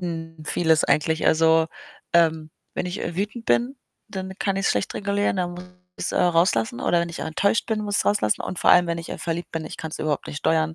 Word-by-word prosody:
hm, 165 -2 -6
vieles 160 -1 +2
eigentlich. 160 +1 +1
Also, 160 0 +4 0.5
ähm, 160 -2 +3 0.2
wenn - - -2
ich, 180 +3 -4
äh, 170 - -4
wütend 210 +4 -3
bin, 250 +4 +1 0.3
dann 190 -1 -5
kann 195 -1 0
ich's 195 - +1
schlecht - - -1
regulieren, 200 0 0
dann 180 -1 -1
muss 175 +1 -8 0.3
ich's, - - -2
äh, - - -2
rauslassen 165 -10 +2
oder 175 - +2
wenn 170 - -2
ich 170 - -7
enttäuscht 200 +7 0
bin, 220 -2 -1
muss 205 -1 -1
ich's - - 0
rauslassen 110 - +2
und 180 - -5
vor - - +4
allem, 175 0 +6
wenn 170 0 -1
ich, 165 - -8
äh, - - -5
verliebt 170 +1 -3
bin, 165 -1 -3
ich - - -8
kann's 160 -1 -6
überhaupt 150 -2 -1
nicht 145 - -5
steuern. 160 +1 +1
170 Hz, 230 wpm, -24 LUFS, 160-195 Hz, 0.5 s, allem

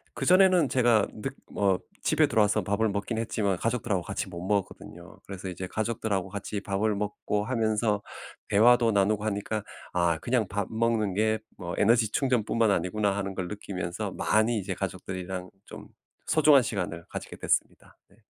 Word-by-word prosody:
그전에는 185 -3 +5
제가 120 -5 +3 0.2
늦 135 +3 -3 0.2
어 100 -2 +2 0.2
집에 - - +3
들어와서 105 -1 +2
밥을 100 +4 +1
먹기는 100 +3 -2
했지만 100 -3 0
가족들하고 115 -4 -1
같이 - - -4
못 85 - -7
먹었거든요. 95 -4 -4
그래서 95 -1 -7
이제 90 +1 -5
가족들하고 110 -3 -2
같이 100 +1 -4
밥을 105 +2 0
먹고 105 0 -2
하면서 110 -3 0 0.5
대화도 115 +3 +5
나누고 105 +1 +2
하니까 105 0 -2 0.3
'아 85 -2 +2
그냥 120 +4 0
밥 100 -1 -2
먹는 110 -3 0
게 110 +2 +2 0.2
뭐 85 -2 -5
에너지 115 -1 +3
충전뿐만 115 -4 +1
아니구나.' 100 +3 0
하는 95 -1 -3
걸 95 -2 -3
느끼면서 90 -4 -4
많이 110 +2 +1
이제 95 0 -3
가족들이랑 90 0 -5 0.2
좀 - - -11 0.4
소중한 150 -4 +5
시간을 90 -7 -4
가지게 - - -7
됐습니다. - - -2
네. 100 - -24
105 Hz, 370 characters per minute, -27 LUFS, 95-115 Hz, 0.5 s, 그전에는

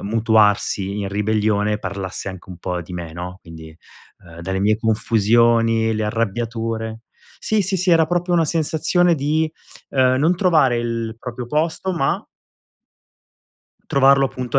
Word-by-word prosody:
mutuarsi 105 -2 +1
in 100 - -3
ribellione 105 +1 0
parlasse 95 0 -5
anche 95 0 -12
un 90 - -8
po' 90 0 -3
di 90 - -12
me, 85 -2 -6
no? 90 +2 -7
Quindi, 80 -1 -12 0.5
uhm, 85 -1 -12
dalle 95 +2 -3
mie 105 +2 +2
confusioni, 115 +1 +2
le 110 - -2
arrabbiature. 115 0 -3 0.4
Sì, 215 -2 +1
sì, 190 +1 -1
sì 180 +1 0
era 165 -1 +5
proprio 175 +1 -1
una 170 -1 +3
sensazione 165 +2 +1
di, 155 +2 0 0.4
uhm, 130 -1 +3
non 165 +5 +3
trovare 155 -10 +3
il 115 -1 -3
proprio 125 -2 -6
posto, 160 +6 -1
ma 135 -6 0 1.7
trovarlo 135 0 +5
appunto 125 -2 -2
115 Hz, 140 wpm, -20 LUFS, 100-145 Hz, 1.7 s, era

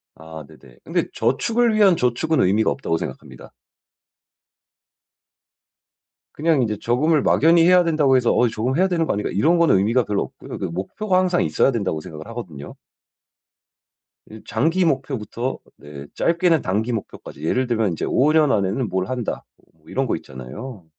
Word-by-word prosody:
아 80 -1 -10
네네. 70 -6 -18
근데 - - -1
저축을 235 -1 +1
위한 200 -5 +4
저축은 125 +6 0
의미가 100 +4 +2
없다고 80 -11 -2
생각합니다. 65 - -9 2.8
그냥 155 -3 +1
인제 105 -2 -2
저금을 145 +5 +2
막연히 165 +2 +4
해야 180 0 +5
된다고 155 -5 +2
해서 120 -2 +2
'어 120 - +3
저금을 120 +6 -2
해야 190 - +4
되는 170 -3 0
거 - - -1
아닌가?' 105 - -3
이런 165 - +2
거는 165 - +4
의미가 115 +6 +2
별로 105 -2 -1
없고요. - - -10
그 - - -4
목표가 185 - -2
항상 180 -1 +1
있어야 135 - +2
된다고 95 -9 -2
생각을 75 -1 -10
하거든요. 85 - -8 1.6
이제 110 0 -11
장기 165 +10 +1
목표부터 130 -3 -2 0.2
네 75 -1 -11
짧게는 170 -1 +2
단기 105 +6 -1
목표까지 80 -8 -7
예를 125 +10 0
들면 110 -5 0
인제 80 - -3
'5 145 +4 +2
년 155 -3 +4
안에는 105 +4 0
뭘 95 +1 -2
한다.' 125 -3 -4 0.3
어 - - -33
이런거 - - -1
있잖아요. 75 - -10
125 Hz, 350 characters per minute, -21 LUFS, 95-160 Hz, 2.8 s, 해야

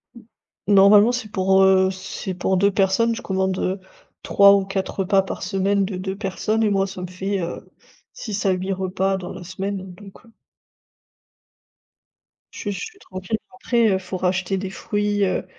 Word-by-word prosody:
Mmh. 235 - -12 0.5
Normalement, 205 +3 +6
c'est 245 -4 -4
pour, 190 -1 +3
heu, 190 0 +4
c'est 190 0 -6
pour 185 +1 0
2 200 +2 +3
personnes, 195 +4 +2
je 240 - -7
commande, 190 -1 -1
heu, 190 +1 -2 0.4
3 200 0 +6
ou 200 -1 +2
4 195 0 -3
repas 195 +1 +3
par 190 - -6
semaine 195 +1 +1
de 190 0 -4
2 190 +1 -4
personnes 215 +2 -1
et 215 - +2
moi 195 -1 +1
ça 190 -1 -8
me - - -3
fait, 190 +2 -3
heu, 170 -1 -6 0.4
6 210 -3 -5
à - - +4
8 185 +1 -2
repas 190 +1 -1
dans 185 -2 -7
la - - -9
semaine, 190 +1 -5
donc 200 +4 -15
heu 230 - -20 2.2
Je - - -10
suis 205 - -3
je 195 - -5
suis 435 -3 -13
tranquille, 185 - -5
bon, - - -18
après, 235 -2 +2
heu, 190 - +2
faut 185 0 -6
racheter 185 +1 -1
des 190 0 -4
fruits, 205 +1 -1
heu 185 - -1
195 Hz, 190 wpm, -22 LUFS, 190-205 Hz, 2.2 s, Normalement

